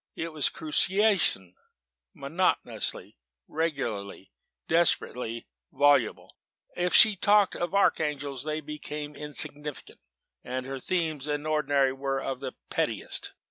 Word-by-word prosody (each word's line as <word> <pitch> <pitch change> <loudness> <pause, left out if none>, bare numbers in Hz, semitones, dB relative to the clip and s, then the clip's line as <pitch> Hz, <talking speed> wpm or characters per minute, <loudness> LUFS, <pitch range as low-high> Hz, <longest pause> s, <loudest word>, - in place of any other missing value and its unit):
it 165 0 -5
was 150 -4 +1
my - - -15
cruciation 180 - +2 0.6
monotonously, 150 - -2 0.3
regularly, 120 - -3 0.4
desperately 125 -8 +1 0.3
voluble. 145 -5 +2 0.4
If 180 0 +1
she 215 -3 +8
talked 205 +1 +3
of 175 +2 -3
archangels, 145 -8 +1
they 155 0 -3
became 150 0 -6
insignificant 150 0 -4 0.4
and 130 +1 -4
her 135 0 -5
themes, 160 -3 -1
in 145 0 -2
ordinary, 145 -3 +2
were 135 0 -2
of 135 -1 -4
the 130 -1 -5 0.2
pettiest. - - -1
150 Hz, 110 wpm, -28 LUFS, 135-165 Hz, 0.6 s, she